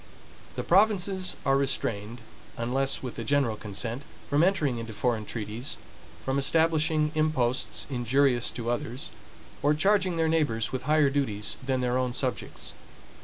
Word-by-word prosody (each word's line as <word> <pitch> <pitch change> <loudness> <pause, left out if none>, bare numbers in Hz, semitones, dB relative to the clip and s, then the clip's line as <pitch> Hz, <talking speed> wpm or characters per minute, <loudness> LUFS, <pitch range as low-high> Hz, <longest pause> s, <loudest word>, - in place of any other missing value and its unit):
The - - -2
provinces 190 -1 +2
are 135 - +4
restrained, 120 -4 -1 0.4
unless 135 +4 0
with 125 - -5
the 115 - -3
general 135 -2 +1
consent, 115 +4 -5 0.3
from 145 +3 +3
entering 150 -10 +2
into 115 -1 -6
foreign 110 0 0
treaties; 115 +3 -5 0.5
from 135 +1 +1
establishing 155 +1 +2
imposts 140 -5 0
injurious 125 -1 +2
to 120 0 -2
others, 120 +2 -4 0.5
or 145 +1 +3
charging 185 +1 +2
their 160 0 +2
neighbors 145 -9 +1
with 130 +2 -4
higher 150 -2 +4
duties 110 -8 -1
than 130 -1 0
their 125 0 +1
own 125 -1 -1
subjects. 130 -1 -3
135 Hz, 140 wpm, -28 LUFS, 120-155 Hz, 0.5 s, are